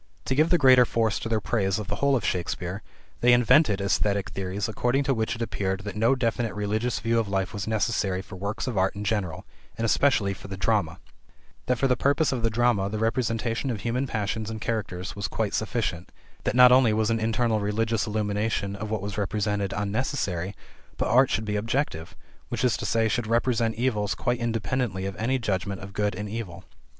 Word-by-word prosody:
To - - 0
give 155 +4 +3
the 175 - +5
greater 130 -4 +7
force 115 -3 0
to 115 - -5
their 110 -1 +1
praise 100 -3 0
of 105 -2 -5
the - - -3
whole 140 -1 +3
of 120 - -1
Shakespeare, 90 +2 -2 0.4
they 125 0 +5
invented 120 -2 +4
esthetic 100 0 0
theories 95 +2 -3
according 120 +5 0
to 135 - +1
which 110 -1 -1
it 115 - -3
appeared 95 -3 -2
that 100 -1 -6
no 115 +5 +3
definite 115 -3 -1
religious 110 +4 -1
view 115 +1 +1
of 110 -3 -2
life 95 -1 -1
was 100 -1 -4
necessary 105 -4 0
for 95 - -10
works 100 +4 -3
of 120 -7 -1
art 95 +1 +1
in 100 - -5
general, 100 -6 -2 0.3
and 115 - -1
especially 110 -4 +2
for 100 - -11
the 95 -1 -6
drama; 95 -4 0 0.7
that 125 - +2
for 135 - +2
the 125 - +3
purpose 140 +5 +2
of 130 -3 -2
the 115 - +2
drama 110 -3 +1
the 110 - -3
representation 115 +2 -1
of 110 -5 -3
human 125 +3 -1
passions 110 -1 -2
and 110 0 -5
characters 100 -5 -3
was 100 -2 -2
quite 110 0 -2
sufficient; 110 -6 -2 0.3
that - - 0
not 125 0 +8
only 125 -3 +5
was 110 +1 +1
an 115 - +1
internal 115 0 +1
religious 110 +2 0
illumination 105 -1 -1
of 105 +1 -5
what 110 -3 -2
was 100 0 -4
represented 100 -1 -1
unnecessary, 100 -4 -2 0.4
but - - -1
art 130 +2 +5
should 110 - -1
be 105 0 -2
objective, 105 - -2 0.4
i.e., 115 -2 +1
should 110 +1 -1
represent 115 -1 +1
events 105 -6 0
quite 120 +5 -1
independently 115 -3 -1
of 95 -1 -4
any 125 +6 0
judgment 100 -4 -2
of 95 +1 -9
good 105 -1 0
and 105 +2 -4
evil. 100 -4 -6
110 Hz, 200 wpm, -26 LUFS, 100-120 Hz, 0.7 s, not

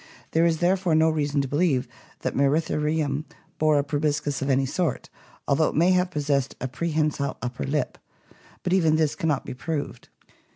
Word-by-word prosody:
There 165 +1 +4
is 165 -1 +1
therefore 180 -1 +2
no 160 +1 +4
reason 145 -2 0
to 135 - -3
believe 145 -2 +1 0.3
that - - -2
Mceritherium 150 0 +1 0.4
bore 155 -1 +4
a 140 - +2
proboscis 145 -1 -1
of 135 - -1
any 135 0 +3
sort, 165 +5 -2 0.4
although 155 +3 +3
it - - -3
may 170 +4 +4
have 180 0 +2
possessed 145 -4 -1
a 130 - -2
prehensile 150 -1 -1
upper 125 0 -4
lip; 145 -1 -2 0.6
but 180 - 0
even 165 -5 +4
this 155 -2 +2
cannot 155 -3 -1
be - - -5
proved. 145 -2 -5
150 Hz, 170 wpm, -25 LUFS, 140-160 Hz, 0.6 s, There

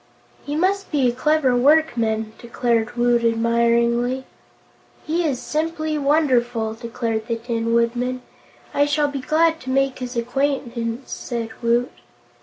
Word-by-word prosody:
"He 290 - -4
must 390 +4 0
be 280 -5 +2
a - - +3
clever 280 0 +2
workman," 240 -6 +2
declared 235 -1 -1
Woot, 240 0 +3
admiringly. 235 +2 +1 0.8
"He 330 +3 0
is 280 -6 -1
simply 310 +1 -2
wonderful," 250 -6 +1
declared 225 -1 -3
the 230 - 0
Tin 230 0 -2
Woodman. 245 +2 0 0.5
"I 285 0 +3
shall 290 0 +1
be 280 -1 -4
glad 320 +4 +2
to 260 - -8
make 270 0 +1
his 250 -1 -5
acquaintance," 245 -1 -2
said 235 -2 -4
Woot. 235 +1 +1
245 Hz, 130 wpm, -22 LUFS, 235-290 Hz, 0.8 s, a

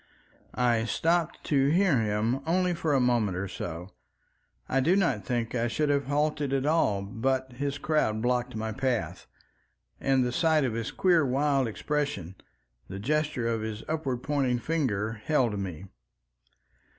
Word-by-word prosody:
I 120 -2 +2
stopped 165 +6 0
to 135 -2 +2
hear 170 -3 +3
him 110 +4 0
only 180 +1 +2
for 160 -3 0
a - - +4
moment 120 -7 +1
or 100 +2 -2
so. 90 0 -6 0.8
I 135 - +1
do 165 +8 +3
not 150 - +1
think 120 0 -2
I 120 -1 0
should 150 +5 0
have 140 -1 +1
halted 145 -1 0
at 135 0 0
all 145 -11 +2
but 130 +6 -1
his 140 +2 -3
crowd 145 -9 0
blocked 125 +1 0
my 110 0 -3
path, 125 0 -2 0.7
and 135 -1 +2
the 125 - -1
sight 160 +2 +2
of 125 -4 0
his 115 0 -3
queer 175 -4 +3
wild 135 0 +1
expression, 115 - -2 0.5
the 95 - -7
gesture 145 +2 -1
of 115 -1 -1
his 110 0 -5
upward 135 -6 -2
pointing 135 -4 +1
finger, 115 -7 -1
held 125 -9 +1
me. 95 -2 -5
130 Hz, 155 wpm, -28 LUFS, 110-150 Hz, 0.8 s, a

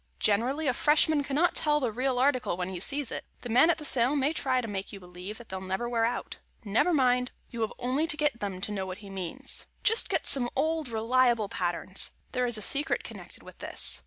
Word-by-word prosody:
Generally, 250 +9 +1
a 255 - +2
Freshman 300 +2 +3
cannot 295 +5 +1
tell 300 -1 +3
the 250 -5 -1
real 255 +3 -1
article 255 -8 +1
when 180 0 -3
he 185 -2 -5
sees 280 +7 -1
it. - - -4 0.2
The 245 - -7
man 250 +8 +5
at 340 - +3
the 305 - -7
sale 255 0 +2
may 285 +2 +1
try 260 -4 +1
to 240 - -3
make 195 -2 -4
you 200 - -9
believe 180 +4 -9
they'll 190 0 -6
never 190 +5 -3
wear 230 -1 +1
out. 240 +1 -4 0.3
Never 215 - +2
mind. 250 -4 +2 0.2
You 235 - -5
have 220 - -1
only 260 +6 0
to 300 - -3
get 295 -5 0
them 195 -4 -4
to 210 - -3
know 190 -2 -3
what 185 0 -6
he 195 - -10
means. 195 +9 -6 0.2
Just 450 +2 +3
get - - 0
some 245 -3 +5
old, 315 0 0
reliable 235 -1 +2
patterns. 180 +1 +1 0.2
There 250 0 0
is 240 -2 0
a 215 - -3
secret 295 - +1
connected - - -10
with - - -14
this. - - +1
245 Hz, 225 wpm, -28 LUFS, 205-285 Hz, 0.3 s, man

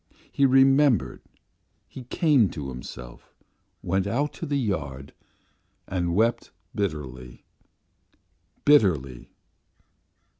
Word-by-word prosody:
He 140 - +3
remembered, 135 - +3 0.7
he 130 - -11
came 140 - +2
to 70 -5 -6
himself, 60 -1 -10 0.5
went 95 +2 0
out 140 +8 -2
of - - -4
the 145 - 0
yard 75 - -4 0.7
and 85 -2 -2
wept 115 +3 +1 0.2
bitterly 65 - -5 1.2
bitterly. 80 - +2
95 Hz, 85 wpm, -25 LUFS, -, 1.2 s, He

